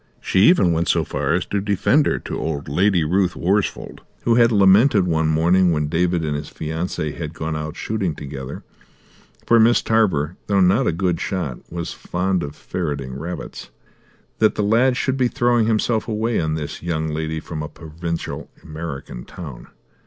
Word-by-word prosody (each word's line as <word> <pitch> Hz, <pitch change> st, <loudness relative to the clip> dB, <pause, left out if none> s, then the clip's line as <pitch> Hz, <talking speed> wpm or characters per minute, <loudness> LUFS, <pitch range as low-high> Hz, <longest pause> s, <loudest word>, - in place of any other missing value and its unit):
She 95 Hz, -, 0 dB
even 165 Hz, -, +5 dB
went 85 Hz, 0 st, 0 dB
so -, -, +2 dB
far -, -, -2 dB
as -, -, -1 dB
to 100 Hz, -, -2 dB
defend 105 Hz, +9 st, +2 dB
her -, -, +1 dB
to -, -, -5 dB
old 75 Hz, -3 st, -3 dB
Lady 90 Hz, +4 st, +2 dB
Ruth 90 Hz, +3 st, +1 dB
Worsfold, 100 Hz, +3 st, -1 dB, 0.2 s
who 120 Hz, -, +3 dB
had 115 Hz, 0 st, +5 dB
lamented 100 Hz, +1 st, +5 dB
one 80 Hz, -2 st, +1 dB
morning 85 Hz, +3 st, +3 dB
when 75 Hz, -2 st, 0 dB
David 85 Hz, 0 st, +1 dB
and 75 Hz, -1 st, -1 dB
his 75 Hz, 0 st, -5 dB
fiancee 80 Hz, 0 st, -3 dB
had 80 Hz, -2 st, -6 dB
gone 80 Hz, 0 st, -3 dB
out 75 Hz, 0 st, -5 dB
shooting 100 Hz, -7 st, -2 dB
together 70 Hz, -2 st, -7 dB, 0.8 s
for 115 Hz, -, +5 dB
Miss 115 Hz, +2 st, +4 dB
Tarver, 90 Hz, -8 st, +1 dB
though 100 Hz, -1 st, +2 dB
not 95 Hz, +8 st, +4 dB
a -, -, +3 dB
good 85 Hz, 0 st, -1 dB
shot, 85 Hz, -10 st, -3 dB
was 85 Hz, -1 st, -4 dB
fond 90 Hz, +1 st, -1 dB
of 70 Hz, -1 st, -6 dB
ferreting 70 Hz, -7 st, -4 dB
rabbits 85 Hz, +3 st, -7 dB, 0.7 s
that 110 Hz, -1 st, +3 dB
the 105 Hz, -, 0 dB
lad 120 Hz, +5 st, +3 dB
should 130 Hz, 0 st, 0 dB
be 130 Hz, -2 st, +3 dB
throwing 120 Hz, -3 st, +2 dB
himself 110 Hz, 0 st, +1 dB
away 110 Hz, +1 st, 0 dB
on 80 Hz, -1 st, -1 dB
this 75 Hz, -2 st, -5 dB
young 80 Hz, -2 st, -2 dB
lady 80 Hz, +1 st, -3 dB
from 80 Hz, 0 st, -6 dB
a 75 Hz, -, -5 dB
provincial 85 Hz, +1 st, -6 dB
American 75 Hz, -6 st, -7 dB
town. 75 Hz, -9 st, -9 dB
85 Hz, 175 wpm, -21 LUFS, 80-105 Hz, 0.8 s, even